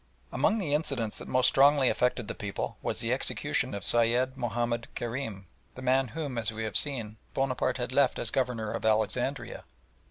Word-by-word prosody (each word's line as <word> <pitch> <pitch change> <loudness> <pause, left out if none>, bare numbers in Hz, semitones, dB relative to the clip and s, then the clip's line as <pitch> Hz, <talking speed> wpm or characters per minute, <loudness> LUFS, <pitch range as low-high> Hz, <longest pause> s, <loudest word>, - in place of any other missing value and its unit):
Among 225 - +2
the 170 -9 -1
incidents 135 -8 -1
that - - -9
most 130 0 +3
strongly 140 -1 +5
affected 125 -3 +1
the - - -3
people 105 -2 -4
was - - -2
the - - +1
execution - - 0
of 100 - -5
Sayed 120 +3 +2
Mahomed 120 -1 -2
Kerim, 115 -5 -4 0.3
the 130 - -8
man 130 +1 +3
whom, 140 -1 -4
as 110 -1 +1
we 110 0 -5
have 110 -2 -4
seen, 115 -7 0 0.2
Bonaparte 130 -1 0
had 120 -1 -3
left 135 0 +3
as 115 - -2
Governor 125 -5 -1
at - - -5
Alexandria. 110 -1 0
125 Hz, 180 wpm, -29 LUFS, 110-135 Hz, 0.3 s, strongly